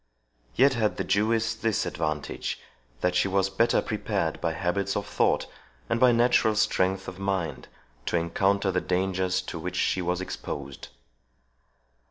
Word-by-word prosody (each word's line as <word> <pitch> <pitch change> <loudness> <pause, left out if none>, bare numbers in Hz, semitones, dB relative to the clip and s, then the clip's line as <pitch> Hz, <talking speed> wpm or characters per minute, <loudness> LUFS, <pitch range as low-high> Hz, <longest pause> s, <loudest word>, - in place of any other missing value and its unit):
Yet 135 +2 +5
had 110 -4 0
the - - -1
Jewess 110 +2 +1
this 110 -1 0
advantage, 75 -1 -3 0.4
that 90 - +2
she 90 - +2
was 95 0 +1
better 115 +5 +2
prepared 100 -6 -2
by 85 -1 0
habits 95 +3 -1
of 100 - -1
thought, - - +1 0.5
and 115 - +2
by 125 0 +6
natural 120 -2 +3
strength 95 -3 +1
of 95 0 -7
mind, 95 -4 -2 0.4
to - - +1
encounter 95 +4 +1
the 90 0 0
dangers 95 0 0
to 85 - -6
which 90 +3 -5
she 95 - +1
was 90 0 -1
exposed. 70 -7 -6
95 Hz, 150 wpm, -27 LUFS, 90-110 Hz, 0.5 s, by